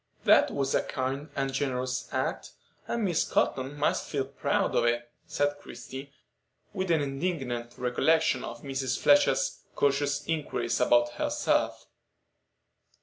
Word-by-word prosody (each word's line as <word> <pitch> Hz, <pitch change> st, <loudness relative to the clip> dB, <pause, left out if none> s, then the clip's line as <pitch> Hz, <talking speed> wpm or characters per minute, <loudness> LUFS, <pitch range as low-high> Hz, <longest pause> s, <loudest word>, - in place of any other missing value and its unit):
"That -, -, +6 dB
was 135 Hz, -1 st, -1 dB
a -, -, +3 dB
kind 135 Hz, +3 st, -3 dB
and 135 Hz, -1 st, -1 dB
generous 130 Hz, -2 st, -2 dB
act, -, -, -2 dB, 0.3 s
and 235 Hz, -2 st, -1 dB
Miss 175 Hz, -5 st, +2 dB
Cotton 135 Hz, +2 st, 0 dB
must 145 Hz, -, 0 dB
feel 135 Hz, -2 st, -1 dB
proud 140 Hz, +1 st, -1 dB
of -, -, +3 dB
it," 120 Hz, 0 st, +1 dB, 0.2 s
said 145 Hz, 0 st, 0 dB
Christie, 135 Hz, -1 st, -9 dB, 0.6 s
with 190 Hz, -2 st, -2 dB
an 160 Hz, -3 st, +3 dB
indignant 135 Hz, -5 st, -3 dB
recollection 130 Hz, +3 st, +2 dB
of 120 Hz, 0 st, -7 dB
Mr. 135 Hz, -2 st, -2 dB
Fletcher's -, -, +3 dB, 0.2 s
"cautious 145 Hz, +1 st, +1 dB
inquiries" 125 Hz, -7 st, -1 dB
about 120 Hz, -1 st, +4 dB
herself. 120 Hz, -, 0 dB
135 Hz, 130 wpm, -28 LUFS, 125-145 Hz, 0.6 s, That